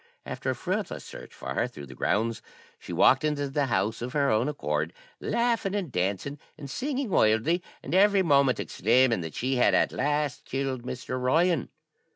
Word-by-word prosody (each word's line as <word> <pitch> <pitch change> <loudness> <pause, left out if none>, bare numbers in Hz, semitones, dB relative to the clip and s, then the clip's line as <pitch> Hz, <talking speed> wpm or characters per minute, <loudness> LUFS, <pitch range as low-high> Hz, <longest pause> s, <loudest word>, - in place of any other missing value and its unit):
After - - -4
a - - 0
fruitless - - -3
search - - -10
for - - -6
her - - 0
through 70 - -10
the 65 - -11
grounds, 115 - 0 0.4
she - - -9
walked 135 +3 +4
into 150 -2 0
the 140 0 0
house 110 -2 0
of 125 +1 -4
her 140 -2 +2
own 110 +6 +2
accord, 75 - -2 0.3
laughing 230 -4 0
and 185 -8 -2
dancing, 100 +9 -2 0.2
and 145 -2 -8
singing 270 - -2
wildly, 115 +9 +3 0.2
and - - -5
every 200 +1 +5
moment 140 -5 +3
exclaiming 115 0 +2
that 80 -2 -7
she 130 +1 0
had 125 - +4
at - - +3
last 145 -1 -1
killed 135 -1 -2
Mr. 125 +1 -5
Ryan. 160 +4 +2
135 Hz, 180 wpm, -27 LUFS, 115-155 Hz, 0.4 s, every